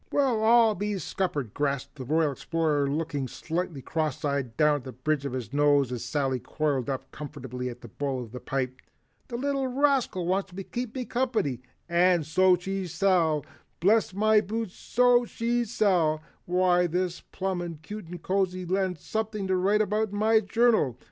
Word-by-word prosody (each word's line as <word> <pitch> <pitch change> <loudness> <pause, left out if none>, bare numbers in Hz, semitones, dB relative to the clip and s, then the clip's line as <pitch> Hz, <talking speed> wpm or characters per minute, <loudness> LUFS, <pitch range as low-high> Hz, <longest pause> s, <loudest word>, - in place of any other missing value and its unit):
"Well 255 -6 +2
I'll 230 -1 +6
be 205 +1 -2
scuppered!" 150 - -2
gasped 140 -2 -2
the 130 -4 -8
Royal 155 +2 +2
Explorer 150 -1 0
looking 145 -2 -2
slightly 165 0 -4
cross 155 -2 -2
eyed 140 -5 -2
down 150 -2 +3
the 130 - -8
bridge 140 +2 -1
of 130 - -6
his 125 -1 -5
nose 145 -3 +3
as 120 -2 -4
Sally 130 0 -1
coiled 140 -3 -1
up 135 -1 -4
comfortably 130 -4 -6
in 120 - -8
the 120 - -10
bowl 130 +2 -3
of 115 - -12
the 125 - -7
pipe. 130 -1 -3 0.5
"The 240 - -4
little 275 0 0
rascal 260 -8 +1
wants 190 +2 0
to 195 +2 -5
keep 245 +3 -5
me 255 -2 -3
company, 230 - -1 0.3
and 175 -1 +3
so 185 +4 +4
she 190 +1 -3
shall, 165 -4 +2 0.3
bless 210 +6 +3
my 215 +2 +4
boots, 215 -1 -4
so 245 0 +3
she 235 +1 -1
shall! 175 -8 +2 0.2
Why 180 0 +3
this 180 +1 -1
is - - -15
plumb 175 -4 -3
cute 210 +1 -7
and 175 -1 -9
cozy 185 -1 0
and 190 -3 0
something 215 +3 -3
to 190 0 +1
write 200 +4 +3
in 210 0 0
my 220 +1 +4
journal." 215 - +2
175 Hz, 175 wpm, -27 LUFS, 145-210 Hz, 0.5 s, I'll